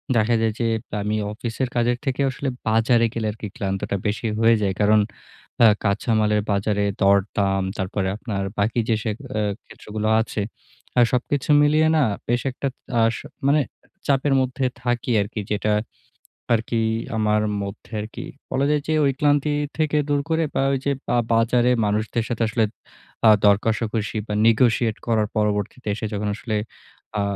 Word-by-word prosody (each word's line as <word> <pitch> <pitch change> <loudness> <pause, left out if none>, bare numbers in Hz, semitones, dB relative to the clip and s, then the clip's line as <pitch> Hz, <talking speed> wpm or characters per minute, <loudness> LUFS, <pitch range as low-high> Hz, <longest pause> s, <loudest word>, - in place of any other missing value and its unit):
দেখা 115 +1 +3
যায় 110 -1 +1
যে 115 - +1 0.4
আমি 105 +1 -1 0.2
অফিসের 120 +3 -3
কাজের 120 0 +2
থেকে 135 +1 -1
আসলে 135 +2 -4 0.2
বাজারে 115 +1 +3
গেলে 110 -2 -2
আর - - -10
কি 105 - -3
ক্লান্তটা 95 0 -2
বেশি 105 +3 -2
হয়ে 115 0 +5
যাই। 95 -2 +1
কারণ 105 +1 +5 0.7
আ - - +9 0.2
কাঁচা 105 +3 0
মালের 105 0 +2
বাজারে 100 0 +1 0.2
দর 100 +1 +6 0.2
দাম, 95 -1 +1
তারপরে 95 0 -2
আপনার 100 -4 -3 0.2
বাকি 110 +4 +1
যে 115 - +4
সে 110 - -1 0.3
আ - - +1 0.2
ক্ষেত্রগুলো 110 0 -5
আছে 110 -1 -3 0.7
সবকিছু 130 +3 -1
মিলিয়ে 155 +2 +4
না 155 - +4 0.2
বেশ 120 +1 +1
একটা 135 +2 -3 0.3
আ - - +4
স - - -5 0.3
মানে 150 +1 +4 0.5
চাপের 140 0 +2
মধ্যে 130 +1 -1 0.2
থাকি 120 0 -1
আরকি 105 +1 -4
যেটা 105 +1 +1 0.8
আরকি 115 +1 0 0.4
আমার 105 0 +2 0.2
মধ্যে 100 +3 -8
আরকি। 110 +2 -7 0.2
বলা 135 +1 +1
যায় 150 -1 +1
যে 160 - 0
ঐ - - +3
ক্লান্তি 145 0 +2 0.3
থেকে 155 -1 +1
দূর 145 -1 +2
করে 160 0 +1
বা - - +1
ঐযে 135 +1 0
বা 120 - +1 0.2
বাজারে 120 +2 +3 0.2
মানুষদের 110 +2 -1
সাথে 120 -1 -2
আসলে 115 -1 +1 0.6
আ - - +9 0.2
দরকষাকষি 110 +1 +1
বা 105 - -3
নেগোশিয়েট 115 -1 +3
করার 110 -2 +1
পরবর্তীতে 105 +2 -1
এসে 110 - -4
যখন 105 0 -2
আসলে 110 -2 -3 0.6
আ - - +1
115 Hz, 160 wpm, -23 LUFS, 105-125 Hz, 0.8 s, আ